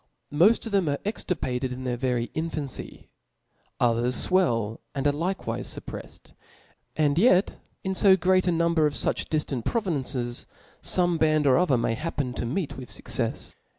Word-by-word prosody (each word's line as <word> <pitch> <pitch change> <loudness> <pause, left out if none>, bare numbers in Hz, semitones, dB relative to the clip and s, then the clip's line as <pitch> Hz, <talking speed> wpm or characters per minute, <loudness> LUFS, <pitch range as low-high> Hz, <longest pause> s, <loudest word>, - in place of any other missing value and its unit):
Moft 195 +12 +4
of 225 - -5
them 195 -6 +2
are 145 - 0
extirpated 130 - -2
in 125 +1 -6
their 125 -1 -1
very 120 -1 -1
in 160 +1 -2
fancy; 145 -5 -6 0.7
others 120 +1 +2
fwell, 115 - +1 0.2
and 135 0 -2
are 145 - +5
likewife 175 +6 -3
fuppreffed. - - -7 0.6
And 150 0 +2
yet 190 -3 +3 0.2
in 190 - -1
To 190 0 +5
great 185 +1 +2
a - - +4
number 170 -2 +2
of 145 - -4
fuch - - 0
diftant 150 -6 -1
pro 230 - 0
vinces, 130 - -3 0.3
fome 175 -2 +2
>band 155 -1 +3
or 135 -2 +5
other 175 -8 +3
may 115 -1 0
happen 140 -2 -3
to 120 - -3
meet 145 +2 -3
with 130 -2 -9
fuccefe. - - -3
150 Hz, 165 wpm, -26 LUFS, 125-180 Hz, 0.7 s, are